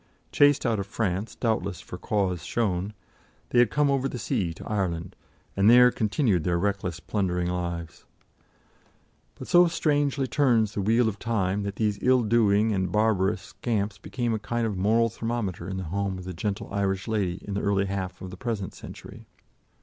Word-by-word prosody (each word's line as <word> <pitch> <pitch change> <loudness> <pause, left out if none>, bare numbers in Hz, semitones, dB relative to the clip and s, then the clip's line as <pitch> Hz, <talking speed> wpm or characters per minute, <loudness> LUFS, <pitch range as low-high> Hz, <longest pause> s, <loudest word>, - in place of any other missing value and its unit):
Chased 145 -1 +4
out 115 -4 +1
of 100 - -4
France, 100 -1 -2
doubtless 100 -6 -1
for - - -9
cause 95 -5 -1
shown, 100 -3 -1 0.6
they 120 - +4
had 120 -3 +5
come 150 +2 +2
over 135 0 0
the - - -5
sea 95 -6 -1
to 80 - -10
Ireland, 90 -4 -2 0.4
and 100 +2 +4
there 125 +1 +8
continued 110 - +1
their 85 +1 +1
reckless 95 -2 -2
plundering 90 -3 -1
lives. 85 -2 -5 1.3
But - - -9
so 175 0 +6
strangely 145 -4 +1
turns 120 -6 +2
the 100 - -2
wheel 115 +4 +3
of 100 -2 -3
time 105 -4 0
that 100 0 -4
these 105 -2 0
ill 130 -1 +4
doing 110 -1 +3
and 95 -3 -1
barbarous 105 -1 +1
scamps 100 -3 -3
became 120 +2 -2
a 110 - -1
kind 120 +2 -2
of 105 -3 -2
moral 110 +5 +2
thermometer 110 -6 -3
in 95 - -4
the 95 - -3
home 95 +3 -2
of 95 - -8
the 90 0 -6
gentle 100 +3 -3
Irish 95 0 -1
lady 100 -5 -1
in 100 - -3
the 100 - -1
early 100 -1 +1
half 95 -1 -4
of 95 - -7
the 90 - -9
present 110 -4 -3
century. - - -11
100 Hz, 180 wpm, -26 LUFS, 95-115 Hz, 1.3 s, there